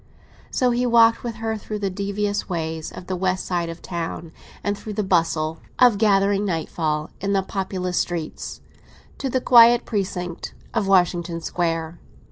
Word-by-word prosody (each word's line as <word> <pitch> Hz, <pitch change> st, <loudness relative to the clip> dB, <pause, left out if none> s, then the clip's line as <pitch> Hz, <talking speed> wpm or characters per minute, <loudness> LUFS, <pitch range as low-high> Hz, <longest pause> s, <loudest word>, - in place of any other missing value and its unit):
So 250 Hz, -1 st, +2 dB
he 245 Hz, +1 st, +1 dB
walked 230 Hz, -1 st, +5 dB
with 235 Hz, -2 st, -4 dB
her 225 Hz, 0 st, -2 dB
through 210 Hz, 0 st, -5 dB
the 200 Hz, -2 st, -2 dB
devious 205 Hz, +1 st, -2 dB
ways 160 Hz, -2 st, -3 dB
of 180 Hz, -, -9 dB
the 185 Hz, -, -3 dB
west 185 Hz, 0 st, -1 dB
side 175 Hz, -2 st, -1 dB
of 165 Hz, +1 st, -8 dB
the -, -, -10 dB
town, 170 Hz, -1 st, -4 dB, 0.3 s
and 205 Hz, 0 st, 0 dB
through 210 Hz, +1 st, -7 dB
the 210 Hz, +1 st, -1 dB
bustle 165 Hz, -3 st, +1 dB, 0.2 s
of 245 Hz, -5 st, +5 dB
gathering 200 Hz, -1 st, +3 dB
nightfall 160 Hz, -4 st, -2 dB
in 200 Hz, +1 st, 0 dB
populous 185 Hz, -2 st, -2 dB
streets, 170 Hz, -3 st, -4 dB, 0.6 s
to 270 Hz, -, -2 dB
the 260 Hz, -, +1 dB
quiet 240 Hz, -1 st, +7 dB
precinct 185 Hz, -5 st, -3 dB, 0.2 s
of 225 Hz, -4 st, 0 dB
Washington 175 Hz, -3 st, +2 dB
Square. 165 Hz, -1 st, -2 dB
190 Hz, 160 wpm, -23 LUFS, 170-210 Hz, 0.6 s, quiet